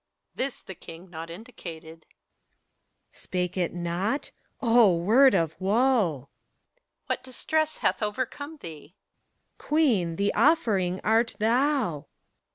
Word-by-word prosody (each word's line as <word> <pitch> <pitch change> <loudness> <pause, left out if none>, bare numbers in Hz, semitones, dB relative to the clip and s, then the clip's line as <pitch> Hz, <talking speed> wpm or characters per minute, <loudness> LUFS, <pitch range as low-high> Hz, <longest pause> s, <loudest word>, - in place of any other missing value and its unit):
This 270 0 -3
the 190 - -8
king 170 +1 -12
not 165 0 -7
indicated. 165 -5 -10 1.1
PHORKYAS. - - -10
Spake 180 -1 -2
it 180 -3 0
nott 175 +9 -2 0.3
O 230 -7 +5
word 240 +10 +5
of 160 -1 0
woe! 195 +4 +1
HELENA. 210 - +2 0.8
What - - -3
distress 310 +5 -1
hath - - 0
overcome 260 +8 -4
theeT 160 - -10
PHORKYAS. - - -50
Queen, 230 - +1
the 200 +3 0
offering 205 - +2
art 225 +2 +2
thou 230 - +1
205 Hz, 120 wpm, -26 LUFS, 170-255 Hz, 1.1 s, O